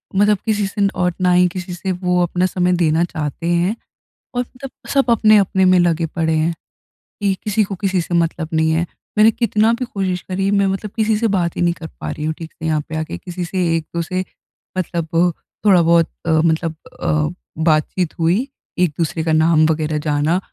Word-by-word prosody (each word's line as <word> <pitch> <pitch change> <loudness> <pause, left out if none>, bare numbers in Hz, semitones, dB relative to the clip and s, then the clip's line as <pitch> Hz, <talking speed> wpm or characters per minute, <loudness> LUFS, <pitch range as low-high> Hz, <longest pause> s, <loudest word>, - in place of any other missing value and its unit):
मतलब 205 +1 +4
किसी 210 -2 +1
से 200 +1 -4
न 200 - +4
और 180 -1 +1
ना 180 0 +3
ही 180 0 +5
किसी 180 +1 -6
से 185 +2 -3
वो 180 0 0
अपना 180 +1 0
समय 180 -1 +1
देना 160 +1 +3
चाहते 160 -1 -4
हैं। 175 +5 +1 0.6
और 245 - +1
मतलब 255 +2 -10 0.2
सब 275 -3 +2
अपने-अपने 210 -4 +4
में 185 0 +5
लगे 170 -1 +2
पड़े 160 0 -1
हैं 160 +2 +1 0.7
कि 200 -1 +2
किसी 215 +1 +1
को 195 -1 -4
किसी 190 -2 +1
से 170 - -5
मतलब 165 -1 0
नहीं 160 0 +2
है। 165 +2 +1 0.3
मैंने 215 +1 +7
कितना 220 -1 +2
भी 250 +2 -2
कोशिश 190 -6 -2
करी 195 +1 0
मैं 200 -1 +3
मतलब 195 +2 -3
किसी 220 -1 +2
से 230 +2 +1
बात 170 -3 0
ही - - -1
नहीं 175 0 +3
कर 160 -2 -9
पा - - -3
रही 150 - -5
हूँ 155 - 0
ठीक 165 -1 -9
से 160 - -8
यहाँ 155 -1 +1
पे 160 - -4
आके। 155 - -4
किसी 180 - -6
से 180 +1 -1
एक 165 -1 -2
दो 170 - +1
से 185 +3 -2 0.5
मतलब 170 -2 -2 0.6
थोड़ा 185 -4 +6
बहुत 170 0 +4 0.2
अ, 165 - -1
मतलब 160 0 +1 0.3
अ, 155 0 +1 0.3
बातचीत 160 +2 +1
हुई, 180 +11 +2 0.3
एक 180 - +4
दूसरे 160 0 -1
का 160 - 0
नाम 155 0 +4
वगैरह 155 -1 0
जाना 150 +3 +1
175 Hz, 210 wpm, -19 LUFS, 160-195 Hz, 0.7 s, मैंने